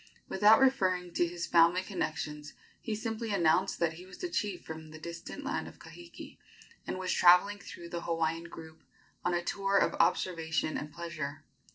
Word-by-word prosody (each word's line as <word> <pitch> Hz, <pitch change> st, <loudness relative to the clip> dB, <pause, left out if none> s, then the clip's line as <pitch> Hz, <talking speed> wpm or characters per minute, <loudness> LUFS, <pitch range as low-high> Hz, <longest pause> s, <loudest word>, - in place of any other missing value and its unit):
Without 210 Hz, +3 st, +6 dB
referring 185 Hz, -10 st, +2 dB
to 175 Hz, -, +2 dB
his 170 Hz, 0 st, -4 dB
family 170 Hz, +2 st, +4 dB
connections, 150 Hz, -5 st, -4 dB, 0.3 s
he 220 Hz, -3 st, -3 dB
simply 225 Hz, 0 st, -4 dB
announced 185 Hz, 0 st, +2 dB
that 170 Hz, -1 st, +1 dB
he 175 Hz, +3 st, -11 dB
was 190 Hz, -, -12 dB
a 360 Hz, -, -1 dB
chief 205 Hz, -, -2 dB
from 160 Hz, 0 st, -8 dB
the 155 Hz, -, -10 dB
distant 170 Hz, +1 st, -8 dB
land -, -, -2 dB
of -, -, -12 dB
Kahiki, 85 Hz, 0 st, -12 dB, 0.5 s
and -, -, -3 dB
was 185 Hz, -1 st, -2 dB
traveling 180 Hz, +4 st, +5 dB
through 170 Hz, -2 st, -10 dB
the 170 Hz, 0 st, -4 dB
Hawaiian 165 Hz, 0 st, -1 dB
group 160 Hz, -1 st, -11 dB, 0.4 s
on 175 Hz, 0 st, +1 dB
a 175 Hz, -, -1 dB
tour 195 Hz, +2 st, 0 dB
of -, -, +3 dB
observation 160 Hz, -3 st, +1 dB
and 150 Hz, +1 st, -4 dB
pleasure. 155 Hz, -4 st, -6 dB
175 Hz, 175 wpm, -31 LUFS, 160-190 Hz, 0.5 s, Without